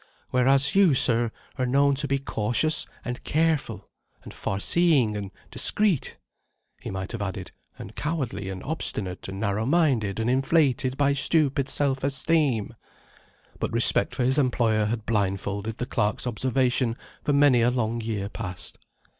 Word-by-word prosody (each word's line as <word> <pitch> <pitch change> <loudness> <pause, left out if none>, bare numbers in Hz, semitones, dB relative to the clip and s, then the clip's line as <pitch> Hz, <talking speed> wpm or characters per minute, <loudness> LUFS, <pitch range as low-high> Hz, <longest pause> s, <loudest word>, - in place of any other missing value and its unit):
Whereas 135 +2 +4
you, 195 -7 +4
sir, 120 -2 +3 0.3
are 130 - +1
known 140 +2 +2
to 145 - -3
be 140 0 0
cautious 135 +4 0 0.2
and 125 0 -6
careful, 150 - -1 0.4
and - - -11
farseeing 130 - +1
and 100 -2 -5 0.2
discreet." 205 -10 +1 0.6
He - - -7
might 95 0 -5
have 115 - -6
added: 95 -2 -5 0.3
And 100 - -11
cowardly 135 - -4
and 95 -1 -7
obstinate, 105 - -2
and 95 0 -7
narrow 105 +1 -2
minded 130 - +1
and 110 - -1
inflated 135 0 +1
by 140 -1 +2
stupid 140 -1 +1
self 135 -2 +2
esteem. 135 -4 0 0.9
But - - -3
respect - - +5
for - - -1
his 130 +4 +3
employer 115 -5 +1
had 110 0 -3
blindfolded 100 0 -2
the 125 - -3
clerk's 110 -4 -2
observation 125 0 0 0.3
for 145 - 0
many 140 -4 +4
a 120 - +3
long 120 -2 -2
year 110 -3 -4
past. 100 -4 -4
125 Hz, 145 wpm, -25 LUFS, 110-140 Hz, 0.9 s, respect